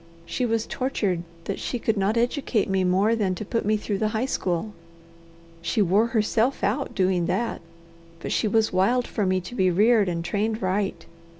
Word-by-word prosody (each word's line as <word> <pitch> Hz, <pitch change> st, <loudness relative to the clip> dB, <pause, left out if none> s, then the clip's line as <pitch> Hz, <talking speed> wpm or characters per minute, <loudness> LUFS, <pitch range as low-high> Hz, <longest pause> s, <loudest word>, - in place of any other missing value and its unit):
She 250 Hz, +7 st, -1 dB
was 225 Hz, -1 st, 0 dB
tortured 205 Hz, -9 st, -1 dB, 0.2 s
that 195 Hz, -, -4 dB
she 245 Hz, -, -3 dB
could 225 Hz, -1 st, 0 dB
not 200 Hz, +3 st, +1 dB
educate 240 Hz, -2 st, 0 dB
me 190 Hz, -1 st, +1 dB
more 190 Hz, +5 st, +3 dB
than 195 Hz, -5 st, 0 dB
to 210 Hz, -, -6 dB
put 230 Hz, 0 st, -2 dB
me 215 Hz, 0 st, +3 dB
through 205 Hz, -1 st, -3 dB
the 215 Hz, -, +1 dB
high 240 Hz, -, 0 dB
school. 190 Hz, -4 st, -2 dB, 0.9 s
She 170 Hz, +5 st, -1 dB
wore 205 Hz, +3 st, +3 dB
herself 230 Hz, +3 st, +1 dB
out 260 Hz, +7 st, -1 dB
doing 185 Hz, -3 st, +1 dB
that, 235 Hz, +5 st, -1 dB, 0.6 s
but -, -, -5 dB
she 220 Hz, -, +1 dB
was 220 Hz, 0 st, +2 dB
wild 235 Hz, +7 st, +2 dB
for 205 Hz, -4 st, -1 dB
me 185 Hz, 0 st, +2 dB
to 185 Hz, +7 st, -9 dB
be 190 Hz, -6 st, +2 dB
reared 210 Hz, +2 st, +4 dB
and 170 Hz, -1 st, -3 dB
trained 215 Hz, +3 st, -1 dB
right. 190 Hz, 0 st, -1 dB
210 Hz, 190 wpm, -25 LUFS, 185-230 Hz, 0.9 s, reared